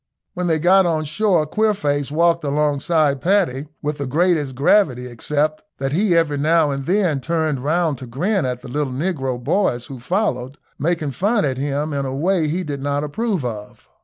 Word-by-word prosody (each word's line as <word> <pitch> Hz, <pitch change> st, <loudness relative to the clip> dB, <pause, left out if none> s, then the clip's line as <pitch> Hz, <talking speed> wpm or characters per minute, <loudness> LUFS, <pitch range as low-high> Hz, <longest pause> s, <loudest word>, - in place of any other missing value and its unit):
When 180 Hz, 0 st, -2 dB
they 160 Hz, -2 st, +2 dB
got 180 Hz, +3 st, +4 dB
on 160 Hz, -2 st, 0 dB
shore 170 Hz, +1 st, +1 dB
Queerface 150 Hz, -8 st, 0 dB
walked 170 Hz, +1 st, +2 dB
alongside 145 Hz, 0 st, +1 dB
Paddy 170 Hz, -8 st, +1 dB, 0.2 s
with 150 Hz, 0 st, -2 dB
the 140 Hz, -, -2 dB
greatest 150 Hz, -2 st, +1 dB
gravity, 135 Hz, -3 st, +3 dB
except 150 Hz, +6 st, -1 dB, 0.2 s
that 135 Hz, 0 st, -2 dB
he 180 Hz, +2 st, +2 dB
every 150 Hz, -4 st, +1 dB
now 155 Hz, 0 st, +3 dB
and 140 Hz, 0 st, -4 dB
then 180 Hz, -6 st, +2 dB
turned 160 Hz, -2 st, -1 dB
round 155 Hz, 0 st, 0 dB
to 130 Hz, -, -8 dB
grin 180 Hz, -, 0 dB
at 125 Hz, -1 st, -3 dB
the -, -, -8 dB
little 140 Hz, +1 st, -2 dB
negro 135 Hz, -4 st, -2 dB
boys 125 Hz, -4 st, 0 dB
who 130 Hz, -1 st, -9 dB
followed, 135 Hz, -, -2 dB, 0.2 s
making 160 Hz, -1 st, -1 dB
fun 205 Hz, -, +1 dB
at 130 Hz, -2 st, -2 dB
him 145 Hz, +2 st, -2 dB
in 140 Hz, -1 st, -2 dB
a 130 Hz, -, -4 dB
way 170 Hz, +2 st, +1 dB
he 175 Hz, +5 st, -1 dB
did 145 Hz, -4 st, -5 dB
not 145 Hz, +1 st, -1 dB
approve 185 Hz, -, -2 dB
of. 105 Hz, -3 st, -7 dB
150 Hz, 185 wpm, -20 LUFS, 135-175 Hz, 0.2 s, got